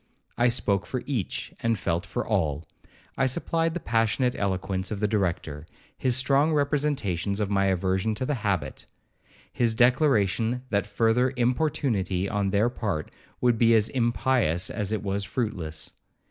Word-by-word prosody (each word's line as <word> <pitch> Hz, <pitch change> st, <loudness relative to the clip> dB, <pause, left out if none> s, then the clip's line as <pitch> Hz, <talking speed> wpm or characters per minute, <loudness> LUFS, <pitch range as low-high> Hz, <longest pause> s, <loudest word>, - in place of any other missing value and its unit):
I 120 Hz, -, +3 dB
spoke 100 Hz, -5 st, 0 dB
for 125 Hz, -, -3 dB
each, 125 Hz, -10 st, -3 dB
and 115 Hz, -1 st, +1 dB
felt 85 Hz, -1 st, -2 dB
for 120 Hz, +5 st, -3 dB
all. 80 Hz, -7 st, -1 dB, 0.5 s
I -, -, +4 dB
supplied 165 Hz, +4 st, -1 dB
the -, -, -1 dB
passionate 115 Hz, 0 st, +1 dB
eloquence 95 Hz, -1 st, -2 dB
of 105 Hz, -, -4 dB
the 105 Hz, -, +1 dB
Director, 85 Hz, -7 st, -2 dB, 0.3 s
his 125 Hz, -1 st, 0 dB
strong 140 Hz, +4 st, +2 dB
representations 140 Hz, -, 0 dB
of 105 Hz, -1 st, -1 dB
my 100 Hz, -1 st, +2 dB
aversion 95 Hz, +3 st, 0 dB
to 130 Hz, -, -3 dB
the 150 Hz, -, 0 dB
habit, 90 Hz, -10 st, -2 dB, 0.7 s
his 115 Hz, -2 st, +1 dB
declaration 120 Hz, -2 st, +2 dB
that 100 Hz, -1 st, +1 dB
further 115 Hz, +4 st, +2 dB
importunity 120 Hz, -, 0 dB
on 100 Hz, -1 st, 0 dB
their 100 Hz, +4 st, +2 dB
part 100 Hz, -10 st, -3 dB, 0.3 s
would 120 Hz, -2 st, +3 dB
be 115 Hz, -1 st, +5 dB
as 110 Hz, -1 st, +3 dB
impious 115 Hz, -, +1 dB
as 105 Hz, -2 st, -2 dB
it 110 Hz, -2 st, -2 dB
was 100 Hz, 0 st, -2 dB
fruitless. 85 Hz, -7 st, -4 dB
110 Hz, 150 wpm, -26 LUFS, 95-125 Hz, 0.7 s, be